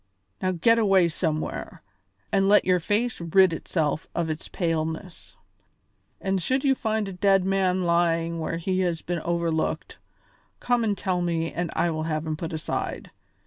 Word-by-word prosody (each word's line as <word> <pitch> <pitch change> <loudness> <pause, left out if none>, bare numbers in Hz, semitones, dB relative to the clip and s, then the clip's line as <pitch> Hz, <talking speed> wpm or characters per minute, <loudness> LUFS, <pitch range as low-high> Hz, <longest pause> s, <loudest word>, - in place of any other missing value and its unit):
Now 185 - +1
get 230 +7 +3
away 195 -5 +4
somewhere, 155 -2 -3 0.5
and 195 0 +3
let 210 - +5
your 180 -1 +3
face 210 +5 -1
rid 175 +1 +4
itself 155 -2 -2
of 165 -2 0
its 155 - -6
paleness; 165 +1 -3 0.8
and 190 -1 -1
should 260 +9 0
you 275 -2 +4
find 220 -4 -1
a 195 - -6
dead 195 0 +3
man 190 -1 +1
lying 170 -1 +1
where 165 +1 -2
he 185 +2 -1
has 175 -3 -1
been 175 -1 -2
overlooked, 170 -1 -2 0.6
come 245 -1 +1
and 210 -3 0
tell 180 -1 -1
me 165 -1 -1
and 175 -1 -2
I 170 - +1
will 155 -1 -3
have 155 0 -2
him 155 -1 -2
put 165 +2 -5
aside. 160 -1 -4
175 Hz, 165 wpm, -25 LUFS, 165-195 Hz, 0.8 s, let